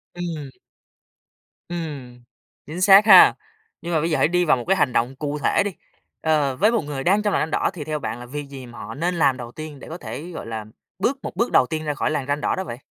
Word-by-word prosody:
Ừm. 165 -5 -5 1.2
Ừm, 145 -8 -6 0.5
chính 165 +5 -6
xác 195 +2 +7
ha! 190 -4 +9 0.5
Nhưng 170 0 -4
mà 160 - +3
bây 165 +3 -1
giờ - - +2
hãy - - +3
đi 180 +2 +1
vào 150 - +4
một 120 - -6
cái 195 - +4
hành 130 -7 +1
động 125 +3 0
cụ 145 +1 -4
thể - - +2
đi, 205 - -1 0.5
ờ, 150 -4 +1
với 210 - +3
một 230 - +1
người 145 -2 -5
đang 200 +6 +3
trong 205 -1 0
làn - - +1
ranh 160 - -2
đỏ - - +1
thì 165 - -6
theo 155 0 -3
bạn 120 - -5
là 120 - -9
việc 140 +2 -7
gì 135 -2 -9
mà 120 -1 -12
họ 110 +2 -7
nên 175 +5 -1
làm 140 -5 +2
đầu 120 -1 -8
tiên 155 0 -9
để - - -11
có 165 - -6
thể, 175 0 -7
gọi 165 - -7
là, 110 -2 -5 0.3
bước 265 +8 0
một - - -6
bước 235 - 0
đầu - - +5
tiên 155 +2 -3
ra 150 -1 -1
khỏi 150 - -1
làn 140 -3 -2
ranh 145 +1 -1
đỏ - - 0
đó 190 - -3
vậy? 120 -10 -7
150 Hz, 265 wpm, -22 LUFS, 135-175 Hz, 1.2 s, ha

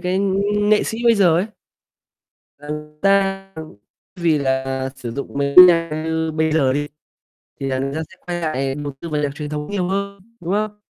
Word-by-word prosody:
cái 180 +1 -1 0.4
nghệ 210 0 +3
sĩ 225 - -4
bây 235 -1 +6
giờ 180 -6 +4
ấy 185 +5 +1 1.1
là 145 +1 -12
người 150 0 -5
ta, 195 -1 +2
ừm, 160 -5 -9 0.4
vì 165 -4 +2
là 130 -1 -1
sử 120 -3 -6
dụng 140 +3 -6
mấy 140 0 -1
cái 180 - +13
nhạc 165 -2 +3
như 160 0 -1
bây 160 0 0
giờ 140 -5 +3
đi 145 +2 -1 0.7
thì 135 - -3
là 130 -1 -1
người 135 +1 -2
ta 160 - -2
sẽ 185 - -16
quay 175 -1 -3
lại 135 -4 -1
đầu 145 0 -5
tư 170 - -6
vào 150 -2 -1
nhạc 145 - 0
truyền 150 -1 -6
thống 150 +3 -5
nhiều 185 -3 -1
hơn, 200 +1 -3 0.2
đúng 175 +2 -3
không? 210 0 -2
160 Hz, 210 wpm, -20 LUFS, 140-185 Hz, 1.1 s, cái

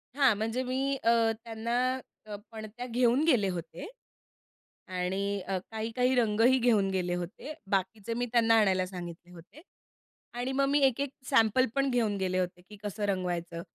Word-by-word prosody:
हां, 275 -4 +5
म्हणजे 225 +4 -1
मी 265 +2 -1
अ, 230 -1 +4
त्यांना 230 0 -4 0.5
अ, 210 -1 -6 0.2
पणत्या 220 +2 -7
घेऊन 245 +3 +2
गेले 245 -11 +3
होते. 175 -2 -6 1.0
आणि 190 +2 -2
अ, 190 0 0
काही-काही 230 +4 0
रंगही 230 +2 +4
घेऊन 220 -5 +3
गेले 180 -2 -1
होते, 180 - -6 0.2
बाकीचे 200 +3 -1
मी 245 +1 -1
त्यांना 230 -2 +4
आणायला 190 -3 +2
सांगितले 175 -1 -9
होते 180 - -14 0.7
आणि 245 +2 -3
मग 275 +1 +2
मी 290 +1 +3
एक-एक 275 +2 -1 0.2
सॅम्पल 255 -1 +4
पण 275 0 +2
घेऊन 225 -5 +1
गेले 185 -1 0
होते 180 -1 -3
की 210 - -10
कसं 205 0 -3
रंगवायचं. 175 -3 -2
220 Hz, 155 wpm, -29 LUFS, 190-245 Hz, 1.0 s, हां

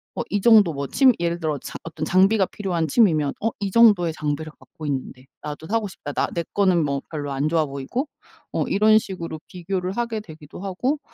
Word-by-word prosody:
어 - - -2
이 205 - 0
정도 210 -6 +6
뭐 140 0 -3
취미 265 -2 +5
예를 170 0 -1
들어 155 -3 -1
장 - - -9
어떤 160 -1 -6
장비가 190 +3 +4
필요한 175 -6 -2
취미면 155 - +3
'어 225 - +1
이 195 -1 -2
정도의 205 -7 +5
장비력 155 0 -4
갖고 155 - -11
있는데 130 -2 -4 0.2
나도 150 +1 -7
사고 220 0 0
싶다.' 145 -5 -8
나 - - 0
내 170 - -1
거는 185 -5 +3
뭐 140 -1 -1
별로 145 -3 -4
안 140 +2 0
좋아 160 -2 +2
보이고 140 - -4 0.4
어 - - 0
이런 215 +2 +5
식으로 170 -6 -6
비교를 185 +1 -4
하게 235 -2 -1
되기도 155 -7 -12
하고 225 +10 -2
175 Hz, 385 characters per minute, -23 LUFS, 155-205 Hz, 0.4 s, 정도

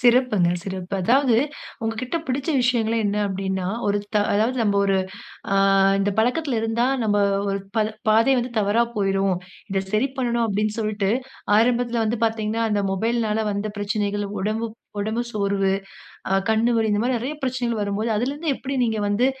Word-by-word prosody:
சிறப்புங்க 240 -7 +4
சிறப்பு. 190 -1 -5
அதாவது 250 +4 +4 0.5
உங்க 225 0 -1
கிட்ட 255 +6 -2
பிடிச்ச 270 +4 -2
விஷயங்களே 230 -2 +1
என்ன 205 +1 0
அப்டின்னா, 190 -1 -2 0.2
ஒரு 205 0 +2 0.2
த - - +4 0.2
அதாவது 220 +5 +1
நம்ம 205 -2 +2
ஒரு 195 -1 +2 0.6
ஆங் 195 0 +4
இந்த 200 +1 +1
பழக்கத்தில 250 +1 +1
இருந்தா 225 +2 +1 0.2
நாம் 205 -1 +2 0.3
ஒரு 195 0 -1 0.2
ப - - +4 0.3
பாதை 225 +5 +5
வந்து 245 +1 -4
தவறா 210 +3 +3
போய்ரும். 195 -2 +1 0.3
இத 195 - +1
சரி 240 +6 +2
பண்ணணும் 235 -2 +1
அப்டினு 210 +1 -1
சொல்ட்டு 210 -2 -1 0.5
ஆரம்பத்தில 235 0 +2
வந்து 220 +1 -1
பார்த்தீங்கனா 220 0 -1
அந்த 205 -1 +1
மொபைல்னால 220 +2 0
வந்த 200 +1 -2
பிரச்சனைகள். 205 0 -1
உடம்பு, 215 +4 -1 0.3
உடம்பு 220 +3 -1
சோர்வு, 200 -2 +1 0.8
கண் 220 0 +2
வலி 225 -1 +2
இந்த 205 - +2
மாதிரி 245 +1 +1
நிறைய 255 +6 -3
பிரச்சனைகள் 250 -3 -1
வரும்போது 205 +3 -1
அதில 245 +6 0
இருந்து 305 +2 -3
எப்படி 270 +1 -5
நீங்க 225 -2 0
வந்து 205 +5 +2
220 Hz, 160 wpm, -23 LUFS, 200-235 Hz, 0.8 s, பாதை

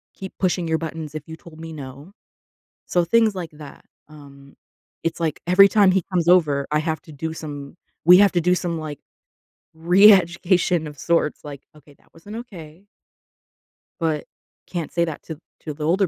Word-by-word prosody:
keep 190 -1 -8
pushing 180 -2 0
your 160 0 +1
buttons 160 -2 -6
if 155 - -5
you 160 - -8
told 160 -1 -15
me 165 0 -8
"no." 140 +3 -10 0.8
So 175 -1 +1
things 220 +4 +3
like 175 -3 -5
that. 150 -2 -13 0.2
Um, 140 -2 -16 0.5
it's, 165 +1 -2
like, 160 -3 -1
every 190 +3 +7
time 205 -2 +4
he 190 0 +1
comes 175 -3 0
over, 150 -6 +3
I 150 - +3
have 160 0 -3
to 155 - -14
do 160 +3 -5
some 145 -2 -8 0.3
we 180 +1 +9
have 200 0 +5
to 175 - +1
do 180 +2 +2
some, 175 -2 -3
like, 150 -3 -7 0.8
reeducation 175 -1 +4
of 145 -2 -11
sorts. 170 -3 0
Like, 140 -2 -9
"Okay, 150 -1 -19
that - - -31
wasn't 200 +6 -11
okay." 180 -6 -11 1.1
but 160 -3 -2 0.4
can't 170 -4 -5
say 170 - +1
that 160 -3 -7
to 160 -2 -8 0.2
to 155 - -6
the 150 +1 -7
older 185 +4 +2
165 Hz, 180 wpm, -22 LUFS, 150-180 Hz, 1.1 s, we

